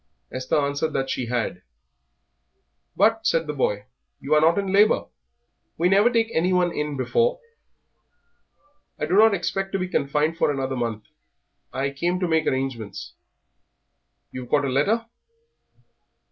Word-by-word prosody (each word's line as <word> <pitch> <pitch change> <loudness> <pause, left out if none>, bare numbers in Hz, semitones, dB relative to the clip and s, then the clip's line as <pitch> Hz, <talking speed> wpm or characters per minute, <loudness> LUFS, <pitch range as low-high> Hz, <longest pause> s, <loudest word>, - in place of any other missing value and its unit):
Esther 130 +2 -1
answered 145 +2 -1
that 135 0 -1
she 125 - -3
had. 120 -1 -2 1.3
"But," 225 +3 +2
said 165 0 +1
the 150 - -4
boy, 105 -7 -1 0.3
"you 140 +3 -1
are 150 - +5
not 165 +3 +4
in 195 -1 -1
labour; 210 +2 +4 0.7
we 175 +2 +2
never 200 +5 +5
take 230 -2 +1
anyone 180 +1 +2
in 150 -2 -3
before." 475 - +1 1.6
"I - - -2
do 165 - -3
not 220 0 +6
expect 195 +1 -3
to - - +1
be 185 -1 -2
confined 150 0 0
for - - +3
another 135 -2 -2
month. 115 -3 -3 0.7
I 135 +1 -2
came 175 +6 -1
to 180 - 0
make 160 -1 +1
arrangements." 130 -6 -3 1.2
"You've 125 -1 -8
got 145 -1 +2
a - - -1
letter?" 200 - +1
155 Hz, 145 wpm, -24 LUFS, 135-195 Hz, 1.6 s, not